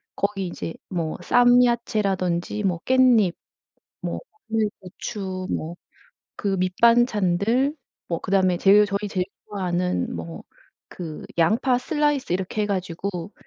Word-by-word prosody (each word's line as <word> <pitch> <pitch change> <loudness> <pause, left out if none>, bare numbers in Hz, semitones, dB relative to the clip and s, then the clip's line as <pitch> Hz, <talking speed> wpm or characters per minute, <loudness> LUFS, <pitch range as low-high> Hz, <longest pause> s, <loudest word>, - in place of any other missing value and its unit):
거기 200 -2 -1
이제 165 -1 -5 0.2
뭐 170 -4 -2
쌈야채라든지 215 -6 +2
뭐 180 -4 0
깻잎, 250 -8 +4 0.7
뭐 - - -4 0.3
마늘, 220 -1 +1
고추, 185 0 -6
뭐 165 +2 -3 0.6
그 - - -4
밑반찬들, 230 - +2 0.3
뭐 170 - -1
그다음에 185 -2 +2
제일 205 +3 +6
저희 200 +1 -2
제일 185 -2 -1 0.2
좋아하는 180 - -2
뭐 85 -1 -7 0.5
그 160 -4 -7
양파 230 +9 +3
슬라이스 295 - 0
이렇게 190 +3 -2
해 - - 0
가지고 185 -1 -3
195 Hz, 245 characters per minute, -24 LUFS, 180-225 Hz, 0.7 s, 제일